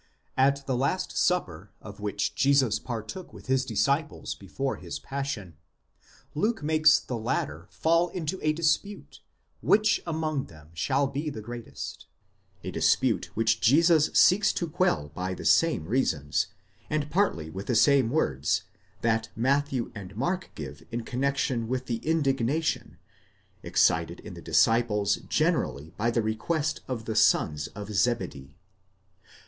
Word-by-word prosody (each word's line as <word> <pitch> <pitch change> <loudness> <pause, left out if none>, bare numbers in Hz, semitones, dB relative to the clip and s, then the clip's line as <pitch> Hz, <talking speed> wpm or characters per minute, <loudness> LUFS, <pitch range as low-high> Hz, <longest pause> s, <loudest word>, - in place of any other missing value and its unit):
At 140 +1 +2
the 130 - -1
last 140 +9 -1
supper 100 - 0
of 105 -1 -11
which 105 -1 -2
Jesus 135 -6 +3
partook 120 - -6
with - - -13
his 130 0 +2
disciples 140 +4 -1
before 130 +8 -4
his - - -6
passion, 135 - -5 0.8
Luke 210 +3 0
makes 155 0 +5
the 120 -3 -5
latter 110 - -2
fall 165 +2 +2
into 180 +1 -4
a 155 - +2
φιλονεικία - - -4
(dispute) 170 +6 -1 0.4
which 215 0 +3
among 155 -4 -1
them 75 -1 -16
shall 135 +12 +1
be 140 +3 -3
the 110 -7 -7
greatest; 120 0 -8 0.6
a - - -4
dispute - - +2
which 110 0 +2
Jesus 155 +5 +5
seeks 195 +3 +5
to 170 - -2
quell 150 - 0
by 95 +2 -3
the - - -8
same 165 - +3
reasons, 80 - 0 0.4
and 150 -1 -1
partly 85 - 0
with 95 +3 -7
the 120 - +1
same 135 0 +5
words, 75 - 0 0.4
that 115 -1 +1
Matthew 135 +1 0
and 100 -2 -9
Mark 180 +9 -1
give - - -7
in 120 0 -3
connexion 130 -2 -1
with 130 +1 -2
the 115 -2 -2
ἀγανάκτησις, - - -12
(indignation), 150 -1 0 0.6
excited - - +2
in - - -9
the - - -10
disciples 115 -3 +2
generally 75 +4 0
by 115 +3 0
the 115 -1 0
request 145 +8 -1
of 115 -4 -4
the 110 - -3
sons 80 -8 +3
of 105 +1 -6
Zebedee. 95 - -1
130 Hz, 145 wpm, -27 LUFS, 110-155 Hz, 0.8 s, makes